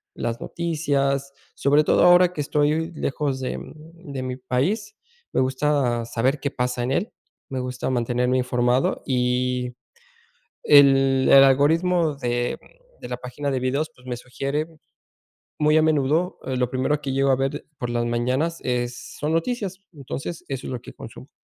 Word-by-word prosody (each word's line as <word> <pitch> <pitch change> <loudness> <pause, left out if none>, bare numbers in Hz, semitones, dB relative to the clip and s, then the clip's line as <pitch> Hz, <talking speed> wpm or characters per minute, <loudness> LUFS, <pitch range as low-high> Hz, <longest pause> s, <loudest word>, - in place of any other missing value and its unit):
las 115 0 -3
noticias. 140 -5 -1 0.2
Sobre 145 +2 +3
todo - - +3
ahora 180 0 +6
que 155 - -8
estoy 150 +3 0
lejos 140 -3 -2
de 130 - -3 0.4
de 140 -6 -7
mi 130 0 -4
país, 190 - -1 0.4
me - - +2
gusta 130 -3 +1
saber 125 +5 0
qué 140 - -2
pasa 125 -1 -2
en 125 - -1
él, 210 - -1 0.4
me 130 -1 -3
gusta 125 0 -3
mantenerme 125 0 +1
informado 125 0 +1
y 125 -1 0 0.9
el 135 -2 +6
el 135 0 +9
algoritmo 160 +4 +3
de 120 -2 -1 0.4
de - - -7
la 125 - -3
página 125 +3 -4
de 130 - 0
videos, 140 +5 -1
pues 125 0 -18
me 125 -1 -3
sugiere 140 +4 -3 0.9
muy 150 +1 +4
a - - +5
menudo, 155 +3 +1
lo 125 -2 -1
primero 130 +3 0
que 135 -2 -3
llego 135 0 +2
a - - +4
ver 135 +1 -2
por 125 - -3
las 120 0 -1
mañanas 130 +8 -1
es 120 -1 -3
son 150 +2 -1
noticias. 190 +1 -2
Entonces 145 +3 -6
eso 135 -2 -4
es - - -5
lo 120 - -5
que - - -11
consumo. - - -11
135 Hz, 160 wpm, -23 LUFS, 125-150 Hz, 0.9 s, el